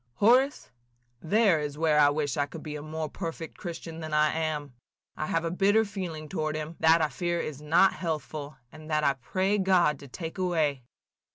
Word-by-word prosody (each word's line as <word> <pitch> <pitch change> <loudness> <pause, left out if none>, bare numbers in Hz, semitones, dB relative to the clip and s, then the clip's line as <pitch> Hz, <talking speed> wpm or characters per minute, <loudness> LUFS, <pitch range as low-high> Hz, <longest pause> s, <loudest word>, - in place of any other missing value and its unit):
"Horace, 255 - +3 0.5
there 200 -1 +3
is 150 -1 -4
where 155 -1 +3
I 145 -1 +7
wish 145 -2 -1
I 145 -1 0
could 160 - -9
be 150 -1 -6
a 150 - -5
more 155 +1 -4
perfect 165 0 -6
Christian 165 -2 -7
than 155 -1 -3
I 150 0 +3
am. 155 -4 -2 0.4
I 155 - -3
have 165 0 0
a 165 - -1
bitter 205 +5 +3
feeling 175 -6 -6
toward 155 -2 -2
him, 155 +2 -5
that 160 0 +5
I - - +3
fear 175 0 -2
is 150 -3 -5
not 165 +6 +4
healthful, 155 -3 -4
and 155 0 -12
that 155 -1 +1
I 140 - +4
pray 190 - -1
God 180 -7 +3
to 140 - -11
take 165 +6 -7
away. 160 -7 +1
160 Hz, 195 wpm, -28 LUFS, 150-175 Hz, 0.5 s, I